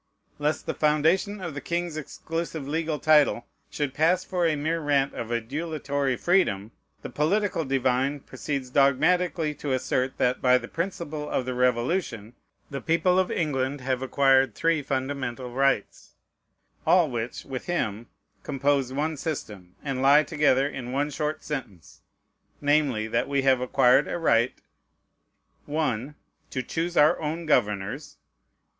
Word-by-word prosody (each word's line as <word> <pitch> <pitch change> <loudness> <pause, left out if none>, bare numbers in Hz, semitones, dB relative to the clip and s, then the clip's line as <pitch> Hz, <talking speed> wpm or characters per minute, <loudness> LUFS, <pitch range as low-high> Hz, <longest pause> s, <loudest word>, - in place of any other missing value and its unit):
Lest 150 +1 -1
the - - -2
foundation 160 +7 +1
of 175 -4 -5
the 145 - -6
king's 170 0 -2
exclusive 160 0 -5
legal 160 +1 -1
title 150 -6 +3 0.2
should 145 -3 -3
pass 170 +5 +2
for 180 -3 0
a 155 - +1
mere 160 +3 -1
rant 140 -3 +1
of 115 - -5
adulatory 140 +2 -2
freedom, 115 - +1 0.3
the - - -5
political 185 +3 0
divine 135 +1 0
proceeds 130 -1 -5
dogmatically 155 +4 +2
to 145 -1 -3
assert, 130 0 -1
that, 125 +1 +1
by 125 0 +5
the 115 -2 -7
principles 165 -4 -4
of 130 - 0
the 130 - -3
Revolution, 125 - 0 0.4
the 140 -1 -4
people 180 +4 +2
of 185 - +1
England 140 -3 -1
have 130 0 -1
acquired 135 -2 +3
three 165 -2 +1
fundamental 130 -2 -3
rights, 135 -4 -1 0.7
all 180 -2 +6
of 145 - -7
which, 120 0 -4
with 130 -2 -6
him, 115 - -2 0.3
compose 140 -2 0
one 150 +4 -1
system, 105 - -6
and 135 -3 -2
lie 140 +3 +6
together 145 -4 +2
in 125 -4 -6
one 145 +3 -1
short 150 +1 -3
sentence: 115 - -7 0.6
namely, 145 -6 +2
that 115 +1 0
we 140 -1 +1
have 130 -2 +3
acquired 125 +2 +4
a - - -3
right 120 -7 +2 1.1
1. 145 -3 -2 0.3
"To 130 - -3
choose 170 +5 -3
our 150 +1 +5
own 160 +2 -3
governors." 105 -9 0
140 Hz, 145 wpm, -26 LUFS, 130-155 Hz, 1.1 s, all